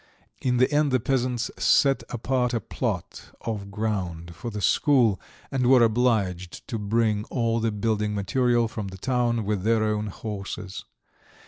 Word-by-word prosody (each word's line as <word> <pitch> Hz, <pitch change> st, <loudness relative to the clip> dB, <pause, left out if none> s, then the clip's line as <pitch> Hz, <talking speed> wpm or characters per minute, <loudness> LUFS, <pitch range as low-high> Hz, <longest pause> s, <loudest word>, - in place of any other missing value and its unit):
In 125 Hz, -1 st, +1 dB
the 130 Hz, +3 st, +3 dB
end 145 Hz, -1 st, +3 dB
the 130 Hz, -, +3 dB
peasants 125 Hz, -1 st, -1 dB
set 135 Hz, +6 st, +4 dB
apart 125 Hz, +1 st, 0 dB
a -, -, +1 dB
plot -, -, -4 dB
of 105 Hz, -3 st, -4 dB
ground 95 Hz, -6 st, -3 dB
for 120 Hz, -, -6 dB
the 105 Hz, -2 st, -5 dB
school, 115 Hz, -, +3 dB, 0.3 s
and 125 Hz, -2 st, +1 dB
were 125 Hz, -2 st, +7 dB
obliged 110 Hz, -7 st, 0 dB
to 115 Hz, -, -2 dB
bring 105 Hz, 0 st, +1 dB
all 115 Hz, -2 st, 0 dB
the 115 Hz, 0 st, 0 dB
building 105 Hz, 0 st, -1 dB
material 120 Hz, +4 st, +2 dB
from 110 Hz, -2 st, -5 dB
the 95 Hz, 0 st, -8 dB
town 120 Hz, +1 st, 0 dB
with 105 Hz, -2 st, -1 dB
their 110 Hz, +2 st, +2 dB
own 105 Hz, 0 st, 0 dB
horses. 100 Hz, -2 st, -6 dB
110 Hz, 155 wpm, -25 LUFS, 105-125 Hz, 0.3 s, were